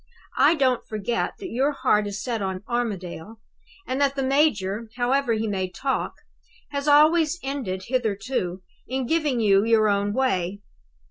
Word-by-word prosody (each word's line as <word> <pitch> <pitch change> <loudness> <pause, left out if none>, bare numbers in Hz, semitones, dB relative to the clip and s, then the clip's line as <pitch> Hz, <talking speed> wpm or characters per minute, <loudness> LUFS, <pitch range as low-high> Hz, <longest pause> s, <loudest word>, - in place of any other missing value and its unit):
I 335 - +6
don't 260 -5 +1
forget 215 +2 -2
that 380 -2 -7
your 275 +5 +1
heart 210 -6 +2
is 200 -1 -5
set 235 -4 -2
on 190 0 -3
Armadale; 215 -4 -4 0.5
and 260 +2 -2
that 280 -1 +2
the 270 - -1
major, 230 -7 +1
however 250 0 +1
he 220 0 -1
may 190 -3 -2
talk, 270 +7 -2 0.6
has 280 0 -3
always 310 +2 +5
ended 255 -9 -3
hitherto 210 -5 -2 0.2
in 260 0 -2
giving 300 -3 +1
you 200 -3 +4
your 220 -1 +3
own 200 0 +1
way. 200 -6 -1
235 Hz, 150 wpm, -24 LUFS, 200-275 Hz, 0.6 s, I